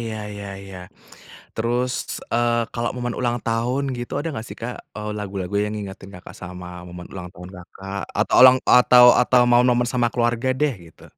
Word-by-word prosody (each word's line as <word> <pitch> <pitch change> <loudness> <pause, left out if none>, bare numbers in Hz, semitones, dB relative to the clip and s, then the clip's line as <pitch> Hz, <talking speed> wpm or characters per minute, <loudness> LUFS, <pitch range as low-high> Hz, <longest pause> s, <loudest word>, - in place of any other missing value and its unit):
iya 115 -1 -4 0.2
iya 100 0 -8 0.2
iya, 95 -1 -10 0.8
terus, 120 +3 0 0.4
eee, 120 0 +1
kalau 120 0 -2
momen 120 -1 -3
ulang 120 -1 0
tahun 120 +4 0
gitu 120 0 -7
ada 165 - -2
gak 110 - -6
sih - - -9
Kak, 120 +2 -4 0.2
eee, 105 0 -4
lagu-lagu 95 -2 -5
yang 105 0 -2
ngingetin 100 -1 -8
Kakak 90 - -12
sama 90 0 -8 0.2
momen 90 0 -9
ulang 90 -2 -7
tahun 90 0 -11
Kakak 95 +2 -8 0.2
atau - - +1
ulang 130 0 +9 0.2
atau 125 0 +7 0.2
atau 125 0 +4
momen 120 0 +3
sama 120 -2 +2
keluarga 120 +1 0
deh 150 -4 +2 0.2
gitu? - - -19
115 Hz, 175 wpm, -22 LUFS, 100-125 Hz, 0.8 s, ulang